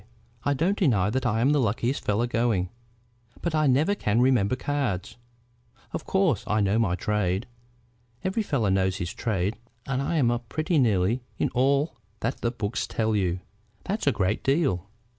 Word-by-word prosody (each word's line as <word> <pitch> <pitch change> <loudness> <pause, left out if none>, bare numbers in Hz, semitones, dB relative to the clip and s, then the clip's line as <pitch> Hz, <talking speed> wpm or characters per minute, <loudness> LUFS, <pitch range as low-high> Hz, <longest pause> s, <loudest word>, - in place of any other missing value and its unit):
I 145 - +1
don't 180 +8 +1
deny 105 - +3
that 130 +1 0
I'm 120 +4 +2
the 150 - +3
luckiest 120 +4 0
fellow 105 +3 +1
going; 115 -6 0 0.7
but 170 - -1
I 155 -1 +3
never 145 +9 +3
can 115 - 0
remember 125 -3 +3
cards. 130 -9 -2 0.8
Of - - -4
course 170 - +2
I 105 - +1
know 100 +2 +2
my 100 -6 +2
trade. 100 0 0 0.8
Every 190 +4 0
fellow 135 - 0
knows 95 0 +1
his 85 -1 -4
trade, 100 -2 -1 0.3
and 135 0 -1
I'm 140 -4 +2
up 120 -1 -3
pretty 155 +1 +1
nearly 110 0 +2 0.2
in - - +1
all 140 +2 +1 0.2
that 115 +4 -1
the 120 - +1
books 115 -1 -3
tell 110 -1 0
you." 90 -3 0 0.4
"That's 205 -4 -2
a - - +6
great 100 -2 0
deal." 135 - +1
120 Hz, 165 wpm, -26 LUFS, 100-140 Hz, 0.8 s, a